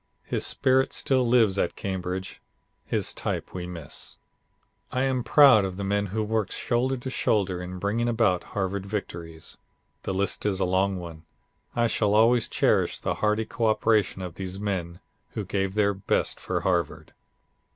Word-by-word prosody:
His - - -2
spirit 130 0 +2
still 130 -2 +1
lives 115 -5 +4
at - - 0
Cambridge; 95 -1 -4 0.5
his - - 0
type - - -4
we 90 -1 -5
miss. 85 -5 -3 0.7
"I 125 - 0
am 130 -2 0
proud 135 -7 +7
of 95 -1 -4
the 100 - -3
men 100 +1 0
who 110 +3 -2
worked 110 -2 -1
shoulder 130 +2 0
to 125 +2 -6
shoulder 95 -7 0
in 90 +1 -6
bringing 105 +5 -1
about 105 -7 +1
Harvard 100 0 -1
victories. 85 -6 -6 0.4
The 95 - -3
list 100 +1 0
is 100 -2 0
a - - +2
long 95 +1 +1
one. 85 -2 -9 0.5
I 120 0 +2
shall 105 -2 +1
always 115 +2 +4
cherish - - +2
the - - -2
hearty 110 +1 +2
co 115 0 -1
operation 110 -3 +2
of 90 -2 -6
these 95 +1 -5
men 90 -4 -3 0.3
who - - -3
gave 95 -1 -2
their 100 -1 +3
best 95 0 -1
for - - -2
Harvard." - - -1
100 Hz, 165 wpm, -26 LUFS, 95-115 Hz, 0.7 s, proud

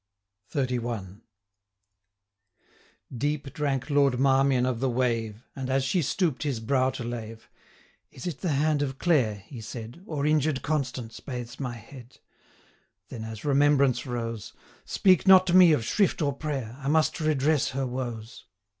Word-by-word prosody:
XXXI. 120 -7 -3 1.9
Deep 145 +2 -2
drank 140 -3 -1
Lord 140 -3 +3
Marmion 135 -1 +3
of 125 -3 -1
the 135 +1 0
wave, 115 -3 -1
And, 135 -1 -5
as 135 0 +1
she 175 +7 +1
stoop'd 155 -1 0
his 140 -6 -1
brow 130 +3 +1
to 130 - -5
lave 115 -1 -7 0.6
'Is 130 - -11
it 170 -6 -4
the 175 -6 0
hand 150 +1 +1
of 135 -2 -2
Clare,' 120 - +1
he 125 -6 -9
said, 115 +3 -8
935 190 +4 -18
'Or 145 -3 -2
injured 150 -3 +1
Constance, 130 -6 -3
bathes 125 -1 -7
my 125 -3 -3
head?' 120 +2 -13 0.9
Then, 110 - -7
as 110 +1 -8
remembrance 140 -2 +3
rose, 115 -3 -4 0.3
'Speak 185 -1 +3
not 185 -1 +8
to 175 - 0
me 180 -3 +8
of 120 -7 +1
shrift 200 - +1
or 145 -3 0
prayer! 135 -5 -4
I 135 - -6
must 155 +3 +2
redress 155 -1 +1
her 135 +1 -2
woes. 120 -3 -6
135 Hz, 155 wpm, -27 LUFS, 120-150 Hz, 1.9 s, not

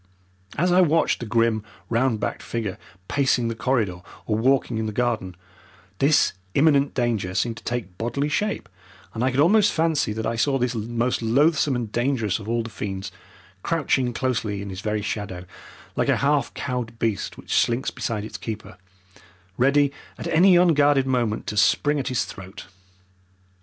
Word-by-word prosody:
As 180 +4 +2
I 180 +1 +6
watched 165 -1 +2
the 120 - -6
grim, 115 -1 +1 0.2
round 115 -1 +1
backed - - -3
figure 110 -5 -4 0.3
pacing 130 -4 +1
the 115 - -3
corridor 110 -7 0 0.2
or 105 - 0
walking 120 0 +1
in 110 - -2
the - - -3
garden, 110 -6 -1 0.6
this 145 +2 +4 0.2
imminent 140 -1 +3
danger 110 -7 -1
seemed 115 +4 0
to - - -11
take 105 -7 -4
bodily 120 +5 -1
shape, 205 +8 -1 0.5
and 115 - -2
I 130 - +3
could 130 +1 -2
almost 205 +7 +5
fancy 160 -7 +1
that 110 +1 -4
I 115 +1 -1
saw 135 +3 +2
this 125 -1 0
most 120 +2 -1
loathsome 140 +4 +3
and 115 -3 -3
dangerous 120 -5 0
of 105 +1 -8
all 115 0 0
the 115 - -8
fiends 95 -2 -5 0.5
crouching 135 - 0
closely 115 -5 -1
in 100 - -6
his 95 +1 -6
very 105 0 -2
shadow, 95 -4 -4 0.5
like - - 0
a - - +3
half 140 -2 +1
cowed 125 -3 -4
beast 110 -4 -2
which - - -6
slinks 120 +2 +1
beside 110 -3 -3
its - - -8
keeper, 110 -4 -7 0.8
ready 140 +4 +3 0.3
at - - -7
any 180 +3 +6
unguarded 145 -6 +4
moment 120 -5 0
to 105 - -4
spring 145 +7 +3
at 135 - -3
his 130 -4 0
throat. 95 -1 -10
120 Hz, 170 wpm, -24 LUFS, 110-140 Hz, 0.8 s, I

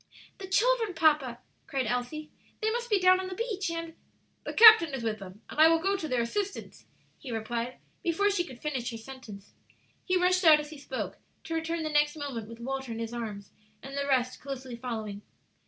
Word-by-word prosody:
"The 380 - -7
children, 445 0 +2
papa!" 300 -7 +3 0.3
cried 270 -4 -1
Elsie; 250 +7 -3 0.3
"they 435 0 0
must 475 +1 -3
be 415 -3 +3
down 370 0 +5
on 375 - -4
the 370 - -6
beach, 410 -4 -2
and 330 0 -5 0.3
" - - -42
"The - - -3
captain 435 -10 +9
is 250 - -5
with 220 -2 -2
them, 195 +2 -11
and - - -8
I 315 - +9
will 330 0 +5
go 390 +4 0
to 335 -5 -4
their 250 -4 +1
assistance," 395 - -4 0.3
he 265 - -8
replied, 235 +2 -3 0.2
before 400 +5 +2
she 360 -3 +1
could 260 -8 -11
finish 265 -5 -2
her 230 - -6
sentence. 225 -4 -11 0.5
He 370 0 +1
rushed 365 +1 +3
out 310 -3 +8
as 300 0 -7
he 305 - -10
spoke, - - -5 0.2
to 330 - -5
return 325 0 -2
the 310 - -2
next 295 0 +3
moment 265 -8 -5
with 230 0 -10
Walter 265 +1 -4
in 225 - -4
his 230 0 -4
arms 215 -4 -6 0.3
and 270 +1 -8
the 280 0 -1
rest 255 -2 +1
closely 265 -3 -6
following. 220 -4 -5
290 Hz, 210 wpm, -29 LUFS, 240-360 Hz, 0.5 s, captain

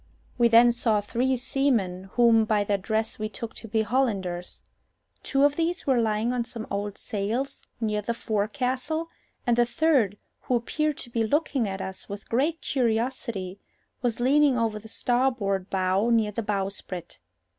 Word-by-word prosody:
We 240 -1 +4
then 235 +1 +7
saw 230 -3 +1
three 250 +5 0
seamen, 235 -8 0
whom 230 -2 +5
by 215 -1 +2
their 200 -1 0
dress 220 +3 -2
we 215 0 -2
took 225 +1 -6
to 225 - -9
be 220 +1 +1
Hollanders. 200 -7 -1 0.6
Two 275 0 +1
of 290 0 +4
these 340 +3 -1
were 260 -4 +3
lying 220 +2 0
on 245 -1 0
some 230 -2 -6
old 205 0 -3
sails 225 +7 -2 0.2
near 210 -2 0
the 230 +3 -2
forecastle, 255 +9 -1 0.4
and 240 - +3
the 240 - +5
third, 245 -8 +2 0.2
who 250 - -1
appeared 300 +5 -1
to 240 - -6
be 230 -1 +1
looking 275 -1 +1
at 190 0 -4
us 190 0 -6
with 200 +1 -8
great 295 +8 +1
curiosity, 230 -6 -1 0.4
was 240 -2 -1
leaning 275 +1 +4
over 225 -2 0
the 220 - -12
starboard 235 -7 0
bow 190 +3 +1
near 225 -3 +3
the 230 - -3
bowsprit. 195 -4 -4
230 Hz, 165 wpm, -26 LUFS, 205-255 Hz, 0.6 s, then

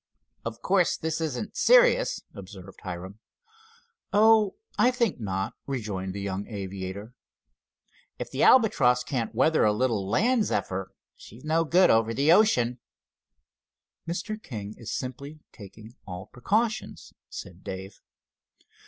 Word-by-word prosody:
"Of 115 0 -6
course, 185 -2 +2
this 160 0 -3
isn't 160 +5 -4
serious," - - +4
observed 95 -1 -11
Hiram. 95 +3 -7 0.9
"Oh, 215 0 +5 0.2
I 245 - +4
think 240 - 0
not," 95 +1 -3
rejoined 100 -8 -4
the 100 - -4
young 100 0 -4
aviator. 100 +1 -6 1.0
"If - - -6
the - - -3
Albatross 125 - +5
can't 120 -3 -3
weather 155 +6 +3
a 105 - +4
little 105 -3 0
land 230 - +2
zephyr, 95 - -2 0.2
she's 115 +5 -14
no 160 +2 +1
good 180 +4 +5
over 115 0 +2
the 145 +4 +3
ocean." 125 - +3 1.3
"Mr. 210 +6 -4
King 105 - -7
is 115 -2 -8
simply 140 +4 -6
taking 110 +2 -13
all 90 0 -7
precautions," 215 - -2 0.2
said 90 +1 -9
Dave. 95 +1 -7
120 Hz, 125 wpm, -27 LUFS, -, 1.3 s, Oh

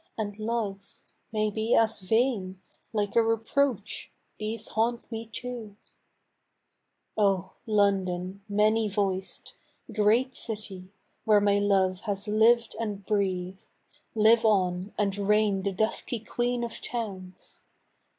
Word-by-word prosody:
And 210 -1 -4
loves 215 -3 -3 0.3
(may 215 -1 0
be 220 +3 +1
as 225 -1 +3
vain 200 -2 0 0.2
!) - - -44
like 210 0 -1
a 230 - +7
reproach 225 0 0 0.3
These 215 +1 -3
haunt 235 +3 -1
me 225 0 -5
too! 230 -2 -6 1.4
Oh! 195 -3 +1
London, 195 -3 +1
many 215 +1 +3
voiced! 195 -2 -2 0.4
Great 230 +5 +3
city, 195 -4 -4 0.3
where 215 -1 +5
my 205 0 +3
love 190 -2 +2
has 200 +1 -2
lived 225 +3 +4
and 205 -3 -4
breathed, 190 -2 -1 0.5
Live 225 +1 +5
on, 190 -2 +2
and 200 -2 +1
reign 205 -1 +2
the 200 +1 -1
dusky 220 +4 0
Queen 240 +2 -1
of 235 - -5
Towns 190 -6 -5
210 Hz, 120 wpm, -28 LUFS, 195-225 Hz, 1.4 s, a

